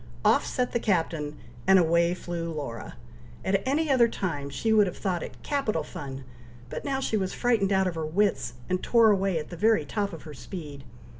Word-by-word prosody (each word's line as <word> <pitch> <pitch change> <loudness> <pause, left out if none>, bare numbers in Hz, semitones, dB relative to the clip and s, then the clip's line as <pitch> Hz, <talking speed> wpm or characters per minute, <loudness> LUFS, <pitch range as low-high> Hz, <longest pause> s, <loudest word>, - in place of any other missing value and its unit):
Off - - +5
set 250 -1 -1
the 235 - 0
Captain, 165 -8 0 0.3
and 190 0 +7
away 170 0 +3
flew 170 -2 -4
Laura. 125 - -6 0.5
At 195 0 +2
any 305 +4 +1
other 245 -3 +5
time 145 -10 -3
she 220 +11 0
would 210 -2 +5
have 180 - -5
thought 185 -4 -1
it - - -7
capital 250 - 0
fun, 135 -2 -7 0.5
but - - -5
now 275 -2 -1
she 225 -5 0
was 190 -2 -2
frightened 225 -5 +2
out 190 -1 +3
of 180 - 0
her 160 -1 -3
wits, 195 - +1
and 185 0 0
tore 230 -2 +5
away 195 -3 +1
at 155 +1 -5
the - - -5
very 215 -3 +3
top 200 +6 -2
of 165 - -9
her 155 - -9
speed. 145 -3 -8
185 Hz, 205 wpm, -27 LUFS, 160-215 Hz, 0.5 s, and